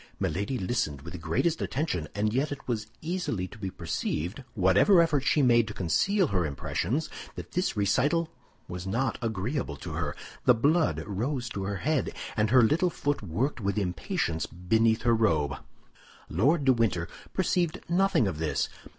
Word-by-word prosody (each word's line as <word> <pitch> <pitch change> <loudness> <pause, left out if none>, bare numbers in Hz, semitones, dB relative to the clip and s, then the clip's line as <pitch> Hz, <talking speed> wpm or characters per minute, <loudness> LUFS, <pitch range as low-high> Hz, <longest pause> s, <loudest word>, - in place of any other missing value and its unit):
Milady 100 - -1
listened 90 - -2
with 85 +1 -8
the 90 - -6
greatest 85 - 0
attention, 120 - -1
and 105 +1 0
yet 140 +4 0
it 145 - -7
was 115 -4 -2
easily 160 - -2
to 105 - -13
be 95 -2 -3
perceived, 90 - -3
whatever 100 - +5
effort 160 -5 +3
she 145 +1 +3
made 120 -3 +5
to 105 - -7
conceal 185 - +2
her 90 -2 +1
impressions, 90 - -2 0.3
that - - -8
this 180 - -1
recital 145 - +2 0.4
was 90 +1 -6
not 115 +5 -1
agreeable 110 - -2
to - - -7
her. - - -2 0.3
The 125 - +7
blood 155 +8 +2
rose 125 +5 -2
to 100 -4 -4
her 100 0 -2
head, 155 -3 0 0.2
and 105 -1 +2
her 125 +1 +6
little 165 +10 +3
foot 145 -3 -2
worked 110 - -2
with 100 0 -1
impatience 85 -4 -1
beneath 110 +6 +1
her 120 - +4
robe. 80 -11 +2 0.7
Lord 145 +3 +2
de 130 - +6
Winter 105 -8 0 0.2
perceived 180 -2 0
nothing 175 - +3
of 85 -5 -3
this. 80 -2 0
115 Hz, 170 wpm, -28 LUFS, 90-145 Hz, 0.7 s, The